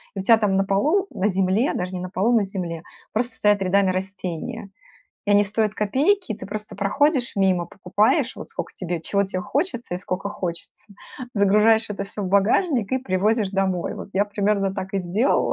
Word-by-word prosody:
И - - -3
у 190 - -3
тя 225 +2 +6
там 210 -3 +1
на 195 - +3
полу, 305 - +2
на 195 - 0
земле, 195 +6 +1
даже 180 +1 -3
не 180 - -4
на 185 - -5
полу, 215 +6 +1
на 220 - +4
земле, 175 -4 -5 0.3
просто 240 +3 -1
стоят 205 -1 +2
рядами 195 +1 +3
растения, 185 +1 -5 0.6
и - - +1
они 205 0 +5
стоят 215 +1 0
копейки. 275 - +1
Ты - - -9
просто 210 +1 -6
проходишь 245 - +1
мимо, 185 -3 +2
покупаешь 195 +4 +1
вот - - -8
скока - - -5
тебе 175 -2 -3
чего 200 +5 0
тебе 185 -1 -4
хочется 255 - -2
и - - -1
скока 190 +1 -4
хочется, 175 -4 -6 0.5
загружаешь 210 +3 +4
это 200 -1 -3
всё 200 +1 -6
в - - -2
багажник, 220 - +2
и 260 - +2
привозишь 210 -1 +1
домой. 190 -2 -1
Вот - - -8
я 200 +2 +2
примерно 200 -1 0
так 195 -1 -5
и 195 - +2
сделала, 190 +9 +1
200 Hz, 195 wpm, -23 LUFS, 190-220 Hz, 0.6 s, тя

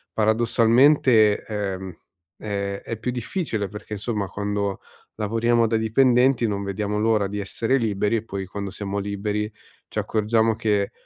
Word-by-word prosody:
paradossalmente, 115 +1 +4
ehm, 95 -3 -4 0.5
è 100 -1 -3
è 115 - -4
più 125 +3 -3
difficile 120 - -3
perché 105 +2 -9
insomma 105 -1 -2
quando 100 0 -2 0.4
lavoriamo 115 +2 +1
da 115 - 0
dipendenti 125 +2 +3
non 100 -1 -2
vediamo 105 +1 -2
l'ora 110 -2 +2
di 105 +1 -4
essere 115 +6 0
liberi 110 -1 0
e 110 - -4
poi 100 -3 -5
quando 100 +1 -5
siamo 100 +1 -4
liberi 105 +1 -2 0.4
ci - - -10
accorgiamo 110 +1 +1
che 105 -3 0
105 Hz, 140 wpm, -23 LUFS, 100-115 Hz, 0.5 s, paradossalmente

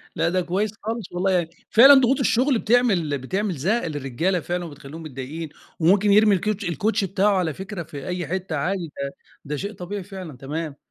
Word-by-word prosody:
لأ 165 +1 +1
ده 185 +1 +1
كويِّس 195 +5 -1
خالص، 225 -2 -4
والله 185 +2 0
يعني 175 -3 +1 0.2
فعلًا 265 +6 +9
ضغوط 265 0 +4
الشغل 255 0 +2
بتعمِل 200 - +2
بتعمِل 190 +8 -2
زهق 195 - 0
للرجالة 150 +5 -1
فعلًا 175 +2 -3
وبتخلِّيهُم 150 +1 -10
متضايقين، 150 +3 -6 0.3
وممكن 195 +5 +4
يرمي 210 0 +6
الكوتش 210 +2 -2
الكوتشي 200 +5 0
بتاعه 195 +1 +2
على 165 -5 0
فكرة 190 0 -6
في 145 -3 -9
أي 180 -3 -3
حتّة 185 -2 -3
عادي، 170 +1 -2
ده 140 - -2 0.4
ده 150 +1 -3
شيء 200 +7 -4
طبيعي 190 +1 -6
فعلًا، 185 -8 -9
تمام. 150 +3 -5
180 Hz, 180 wpm, -23 LUFS, 160-205 Hz, 0.4 s, فعلًا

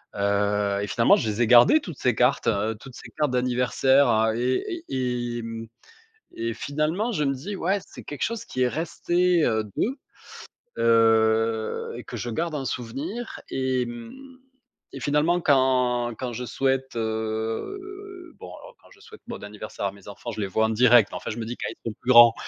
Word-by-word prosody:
heu, 100 0 +1
et 100 - -3
finalement 115 +4 +4
je - - -1
les 105 +3 -2
ai 120 - +3
gardées 120 - +7
toutes 170 - -8
ces 125 -3 +1
cartes, 125 +4 +2
heu, 110 +1 +1
toutes 130 0 -12
ces - - -11
cartes 150 -3 +1
d'anniversaire, 125 +2 +2
heu, 110 0 +2
et 335 - -1
et 125 -2 -2
et - - -4
mmh 115 0 -6 0.7
et 115 0 -2
finalement 155 - -1
je 150 -7 0
me 135 - +1
dis: 175 +10 -6
«Ouais, 190 +3 0
c'est - - -12
quelque 145 -3 -7
chose 230 -1 -2
qui 130 - -5
est 125 - +3
resté, 175 +3 +1
heu, 110 -2 +1
d'eux». 260 +5 0 0.8
Heu, 110 -1 +2
et - - -8
que - - -7
je - - -4
garde 165 +7 -2
en 140 -2 -3
souvenir 150 - -5
et 130 -1 0
mmh 255 - -10 0.5
et 135 - -7
finalement 150 +6 +2
quand 125 -3 +2
quand 125 -2 -4
je 125 +2 -5
souhaite, 135 +2 -1
heu, 320 - -4
bon, - - -10
alors - - -13
quand - - -20
je 410 - -20
souhaite 440 0 -14
bon 240 - -7
anniversaire 105 -1 -6
à 95 - -2
mes 100 -1 -16
enfants, 100 +3 -7
je 110 - -6
les 100 - -1
vois 110 +3 +1
en - - -2
direct, 120 -1 +5
enfin - - -5
je 110 - -5
me 115 - -3
dis 120 +2 -5
quand - - -3
ils - - -10
seront 115 - -4
plus 130 - -2
grands 120 -2 +9
125 Hz, 200 wpm, -25 LUFS, 115-155 Hz, 0.8 s, grands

